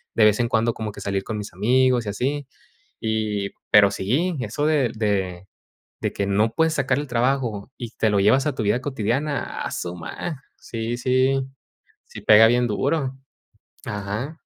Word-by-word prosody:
de 115 - +4
vez 105 +1 +4
en 120 - +2
cuando, 115 0 +1
como 110 -2 -5
que - - -10
salir 100 -1 -2
con 110 - -4
mis 105 0 -6
amigos 125 +4 +2
y - - -3
así. 135 +7 -2 0.5
Y 110 -2 -1 0.2
pero 100 -1 +7
sí, 140 - 0
eso 145 +4 -2
del 145 -7 +2
de 95 -4 -2 0.5
de - - -1
que 100 - -2
no 105 +3 +2
puedes 160 +2 +2
sacar 135 -2 +1
el 145 - -3
trabajo 120 -3 -1
y 120 -3 -6
te 110 - +1
lo 100 -1 +2
llevas 130 +8 +4
a 150 - 0
tu 115 - -3
vida 105 +5 +2
cotidiana, 135 +3 -2
¡a - - -4
su 85 0 -4
ma! 135 - -6
Sí, 115 +1 -4
sí, 130 +2 +2 0.7
sí - - -10
pega 110 +1 +7
bien 120 +1 +3
duro. 135 +4 -1 0.7
Ajá. 105 +10 -4
115 Hz, 175 wpm, -23 LUFS, 105-135 Hz, 0.7 s, pero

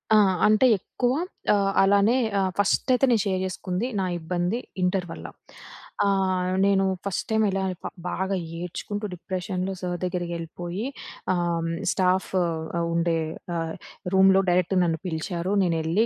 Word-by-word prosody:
ఆ! - - +7 0.3
అంటే 215 +4 +5
ఎక్కువ 245 +6 -1 0.4
ఆహ్, 195 -1 +2
అలానే 200 +4 +4 0.2
ఆహ్, 190 -1 +1
ఫస్టయితే 250 +6 +3
నేను 225 - +4
షేర్ 185 -2 0
చేసుకుంది, 185 +4 -3
నా 190 - +1
ఇబ్బంది 175 +6 -1 0.2
ఇంటర్ 180 0 +1
వల్ల. - - -8 0.8
ఆహ్, 190 -2 +1 0.2
నేను 195 -1 +3 0.2
ఫస్ట్ 195 - -2
టైం 220 0 +2
ఎలా 195 0 -1 0.2
ప - - -3 0.2
బాగా 190 +1 -1 0.2
ఏడ్చుకుంటూ, 205 +4 -4
డిప్రెషన్‌లో 185 +1 -3
సర్ 180 -1 -2
దగ్గరికెళ్ళిపోయి 175 +2 -4 0.5
ఆహ్, 170 -2 0 0.2
స్టాఫు 185 0 +1 0.4
ఆ - - 0
ఉండే 170 0 +1 0.4
ఆహ్, 165 -1 -2 0.4
రూమ్‌లో 190 0 +6
డైరెక్ట్‌ 180 +1 +2
నన్ను 165 -2 0
పిలిచారు. 175 +3 -2
నేనేళ్ళి 165 +5 +1
185 Hz, 130 wpm, -25 LUFS, 175-195 Hz, 0.8 s, ఆ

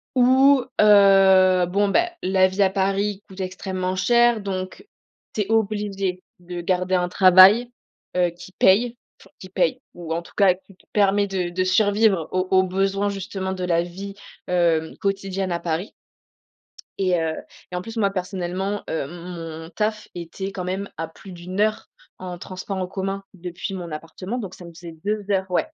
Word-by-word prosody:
où, 260 +2 +5 0.2
heu, 195 -3 +6
bon, 200 +3 +1
ben, 350 - +2
la 185 0 +4
vie 190 +2 -2
à 190 - +4
Paris 195 +1 -1
coûte 190 0 -12
extrêmement 185 0 -3
cher 240 +2 +3
donc 190 - -5 0.5
tu 215 - -1
es 210 +2 -3
obligée 200 -4 -1 0.2
de 175 0 -7
garder 185 +1 0
un 180 0 0
travail, 190 +6 +7 0.5
heu, 175 -1 +2
qui 175 +2 -13
paye, 230 +5 +4 0.2
enfin - - -18
qui 185 - -11
paye, 180 -3 0
ou 170 -2 -5
en 170 - -2
tout - - -17
cas 195 -3 +5
qui 190 +1 -21
te - - -27
permet 200 0 +3
de 185 -2 -2
de 185 +1 -1
survivre 200 -2 +2
aux 185 0 0
aux 190 0 +5
besoins 195 +2 0
justement 190 -1 -4
de 185 -1 -5
la 170 -1 +2
vie, 195 +3 -8 0.3
hem, 170 -3 +1
quotidienne 195 -1 -2
à 170 - -1
Paris. 170 +4 -3 1.1
Et 185 -3 +2
heu, 160 -1 -1 0.4
et 180 - -2
en 180 - -3
plus 225 +4 -9
moi, 200 -2 +2
personnellement, 190 +1 -3
heu, 160 - -1
m 140 - -7
mon 170 -2 -8
taf 215 +4 -2
était 175 +3 -6
quand 185 -2 -5
même 190 +2 -3
à 165 0 -4
plus 185 +3 -13
d'1 180 +3 -5
heure 215 0 0 0.3
en 180 -1 -7
transport 185 +2 -6
en 185 - -2
commun 195 +1 -4
depuis 180 +2 -6
mon 175 -4 -6
appartement 185 +8 -6
donc 195 -6 -6
ça 180 - -12
me 170 - -11
faisait 165 -1 -11
2 210 -1 -2
heures 190 -1 0
ouais, 180 - +1
190 Hz, 180 wpm, -23 LUFS, 180-200 Hz, 1.1 s, travail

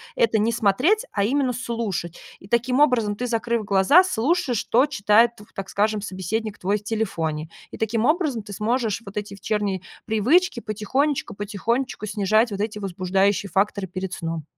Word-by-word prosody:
это 230 -1 +3
не 220 +2 +2
смотреть, 250 - +2
а 200 - 0
именно 260 +3 +1
слушать. 225 -8 -4 0.2
И 190 - -15
таким 250 +4 +2
образом 235 -8 +3
ты, 245 - -3
закрыв 235 -1 -1
глаза, 200 - +5
слушаешь, 310 -3 0
что 245 +5 +3
читает, 230 -2 +3
тв 210 - -13
так 195 -1 -5
скажем, 210 +1 0
собеседник 205 +3 -4
твой 200 +3 0
в - - -23
телефоне. 165 -8 -2 0.2
И - - -8
таким 220 0 0
образом 305 - +1
ты 205 - -10
сможешь 225 +1 -1
вот 195 - -10
эти 205 -1 -4
вечерние 200 -2 -2 0.2
привычки 250 - +2
потихонечку, 240 +7 -1
потихонечку 215 +4 -2
снижать 215 +2 +2
вот 200 - -4
эти 210 0 -2
возбуждающие 195 +1 0
факторы 195 +2 0
перед 185 +1 -5
сном. 165 -2 -4
215 Hz, 165 wpm, -23 LUFS, 200-240 Hz, 0.2 s, глаза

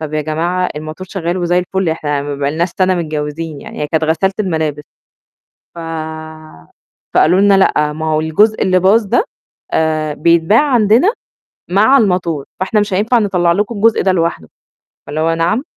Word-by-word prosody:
"طَب 155 -1 -5
يا 155 - 0
جماعة 170 +4 -1
الموتور 155 +5 -7
شغّال 175 -2 -3
وزي 175 0 +1
الفُل، 185 0 -2
إحنا 145 -3 -2
ما 145 0 -4
بقالناش 145 +5 -1
سَنة 185 0 +3
متجوّزين 155 -2 -4
يعني." - - -9
هي - - -1
كانت 160 +1 0
غسالة 165 +5 +1
الملابس. 160 -6 -2 0.9
ف - - -8 1.3
فقالوا 180 +4 +4
لنا: 200 0 +5
"لأ، 150 -5 +2
ما 160 +1 -5
هو 155 - +1
الجزء 205 +8 +2
اللي 185 -1 +3
باظ 205 +5 +3
ده 235 - +2 0.5
آآ 155 -1 0
بيتباع 170 +7 +3
عندنا 235 - +3 0.6
مع 215 +9 +4
الموتور، 180 - 0
فإحنا 195 +3 0
مش 205 -1 -1
هينفع 215 +6 +2
نطلّع 180 -5 +1
لكم 205 +6 -1
الجزء 220 +2 +2
ده 190 - +2
لوحده." 170 - -1 0.6
فاللي 150 +2 -4
هو 165 +1 +1
نعم! 170 +9 0
170 Hz, 165 wpm, -15 LUFS, 155-195 Hz, 1.3 s, لنا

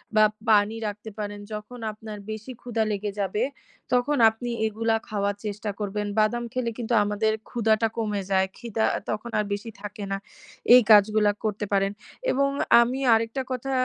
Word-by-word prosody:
বা 215 - +7 0.2
পানি 210 +1 +4
রাখতে 210 +1 -6
পারেন। 205 0 -4
যখন 210 +4 -7
আপনার 215 0 -9
বেশি 220 +4 -6
ক্ষুধা 230 -2 -1
লেগে 205 0 -2
যাবে, 200 +3 0 0.5
তখন 270 +4 +2
আপনি 240 +2 -6 0.2
এগুলা 225 +1 0
খাওয়ার 200 -1 -1
চেষ্টা 210 +1 -3
করবেন। 205 0 -2
বাদাম 240 +3 +2
খেলে 245 -2 -1
কিন্তু 235 0 -2
আমাদের 210 +1 +1 0.2
ক্ষুধাটা 225 -1 +2
কমে 210 -3 -1
যায়। 190 0 +3
ক্ষিদা 225 -2 -1 0.3
তখন 215 +3 -4
আর 210 - 0
বেশি 210 +3 -5
থাকে 205 0 -7
না, 195 - 0 0.6
এই 250 - +9
কাজগুলা 210 0 +6
করতে 210 0 -1
পারেন। 195 0 +2 0.4
এবং 275 +1 +2 0.3
আমি 250 +3 0
আরেকটা 230 +4 +1
কথা 255 +2 -3
215 Hz, 160 wpm, -25 LUFS, 205-235 Hz, 0.6 s, এই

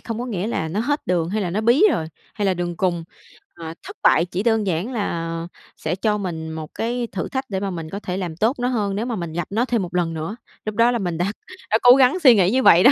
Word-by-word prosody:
không 230 -1 -5
có 245 - -3
nghĩa 205 -4 -2
là 160 -8 -2
nó 190 +7 -2
hết 290 +5 -1
đường 170 -2 +1
hay 210 +3 -1
là 180 - -2
nó 205 +5 -1
bí 240 - +4
rồi, 160 - -1 0.3
hay 205 -2 -1
là 190 - +2
đường 175 -1 -3
cùng, 175 -2 0 0.5
à, 165 -1 -7
thất - - -10
bại 165 - +5
chỉ 180 +2 -3
đơn 225 -3 +2
giản 185 +7 -1
là 165 -7 -3 0.3
sẽ 160 +3 -2
cho 210 +2 0
mình 165 -5 -4
một 160 -1 -7
cái 240 +1 -2
thử 180 - -3
thách 265 0 -3
để 190 -1 -2
mà 200 - -2
mình 165 -4 -5
có 200 +4 -5
thể 180 -2 -4
làm 175 -4 -4
tốt 225 +7 +2
nó 245 - 0
hơn 210 -6 -1
nếu 215 +3 -2
mà 245 -2 -2
mình 170 -5 -5
gặp 175 -1 -3
nó 225 +4 +1
thêm 240 -4 0
1 180 -1 -5
lần 170 -2 0
nữa, 160 +7 -4 0.3
lúc 215 -1 -3
đó 230 +2 +4
là 240 - 0
mình 175 -4 -2
đã 175 - 0 0.4
đã 220 - +4
cố 245 0 +9
gắng 270 +6 +4
suy 260 -9 +7
nghĩ 185 -1 +3
như 260 +2 +2
vậy 175 -4 +7
đó. 260 - +8
195 Hz, 285 wpm, -22 LUFS, 170-230 Hz, 0.5 s, cố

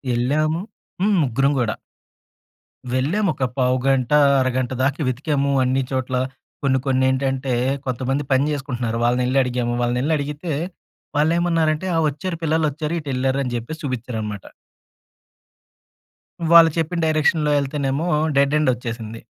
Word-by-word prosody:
ఎళ్ళాము 155 +7 +1 0.4
హ్మ్. 205 -1 +3
ముగ్గురం 135 +2 +1
కూడా. 115 -3 0 1.2
వెళ్ళాము. 170 +11 +1
ఒక 130 - -4
పావుగంట, 130 +1 +1 0.3
అరగంట 130 -1 0
దాకా 140 +3 0
వెతికాము 140 +2 0
అన్ని 130 +1 +1
చోట్ల. 130 -1 -2 0.5
కొన్ని 130 -1 +2
కొన్నేంటంటే 130 0 +1 0.3
కొంతమంది 130 +3 -1
పని 130 +1 +3
చేసుకుంటున్నారు. 125 -5 -3
వాళ్ళనెళ్లి 125 +2 +2
అడిగాము. 120 -1 -1
వాళ్ళనెళ్లి 125 +6 0
అడిగితే 150 +4 -4 0.7
వాళ్ళేమన్నారంటే, 165 +1 +1
"ఆ! - - +2
వచ్చారు. 165 +4 -5
పిల్లలొచ్చారు. 155 0 0
ఇటెళ్లారు" 135 -1 -1
అని 125 - -4
చెప్పేసి 135 +7 -5
చూపించారన్నమాట. 110 -6 -4 2.1
వాళ్ళు 165 -1 +9
చెప్పిన 165 +2 -1
డైరెక్షన్‌లో 155 -1 +2
ఎళ్తేనేమో 140 +3 -2 0.3
డెడ్ 140 +2 +3
ఎండ్ 150 -3 +2
ఒచ్చేసింది. 115 -2 -6
135 Hz, 110 wpm, -21 LUFS, 125-155 Hz, 2.1 s, వాళ్ళు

